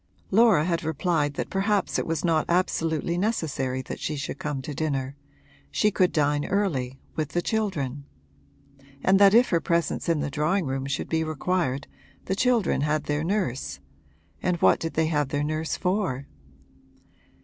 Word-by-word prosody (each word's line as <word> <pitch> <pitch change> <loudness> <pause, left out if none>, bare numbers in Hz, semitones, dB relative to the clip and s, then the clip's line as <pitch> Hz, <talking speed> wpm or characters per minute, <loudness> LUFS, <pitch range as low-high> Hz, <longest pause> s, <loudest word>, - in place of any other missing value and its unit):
Laura 210 -7 +5
had 170 -1 -1
replied 155 -1 0
that - - -4
perhaps 200 0 +1
it - - -3
was 165 +1 -1
not 160 -2 +2
absolutely 170 -1 0
necessary 145 - -1
that - - -7
she 155 - -2
should 140 0 -5
come 150 -2 -3
to 140 +3 -6
dinner 140 -3 -2 0.5
she 210 - +2
could 185 -2 +2
dine 145 -1 +1
early, 140 -11 -1 0.2
with 155 -2 -2
the 175 - +1
children; 145 - -2 1.0
and 190 +1 +4
that 200 +1 +7
if 245 +2 +6
her 170 -2 +2
presence 170 0 0
in 165 -2 +2
the 145 - -2
drawing 175 +6 +1
room 135 0 -2
should 140 - -2
be 160 0 0
required 155 -3 -1 0.4
the 190 - -1
children 235 - +2
had 150 +1 0
their 145 +1 -1
nurse 150 - -2 0.6
and 180 -1 +1
what - - +4
did 165 - -4
they 160 - +3
have 150 -3 0
their 145 +1 -1
nurse 155 +1 -2
for? 180 -8 -1
160 Hz, 165 wpm, -26 LUFS, 145-185 Hz, 1.0 s, that